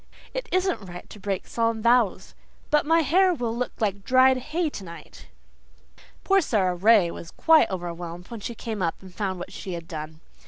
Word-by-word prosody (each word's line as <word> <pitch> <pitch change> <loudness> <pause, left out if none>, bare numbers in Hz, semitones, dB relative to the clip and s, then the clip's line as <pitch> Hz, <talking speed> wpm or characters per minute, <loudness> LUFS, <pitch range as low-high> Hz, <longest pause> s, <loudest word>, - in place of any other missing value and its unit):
It - - -4
isn't 365 - 0
right 175 0 -9
to 210 - -11
break 195 -1 -3
solemn 230 -1 -1
vows. 235 -4 +2 0.4
But 300 -1 +3
my 330 +1 +4
hair 360 +5 +3
will 235 -4 -2
look 250 +1 -2
like 200 -2 -1
dried 260 +3 +5
hay 315 +6 -2
tonight." 170 - -9 1.0
Poor 390 0 +4
Sara 195 - +1
Ray 190 -1 +4
was 170 - -9
quite 320 -1 +4
overwhelmed 175 -1 -6
when 230 - -6
she 230 +3 -6
came 220 -2 -5
up 165 -2 -1
and 185 -1 -12
found 190 -1 -2
what 180 +2 -8
she 185 - -6
had 170 -1 -6
done. 155 -1 -7
215 Hz, 185 wpm, -25 LUFS, 180-260 Hz, 1.0 s, dried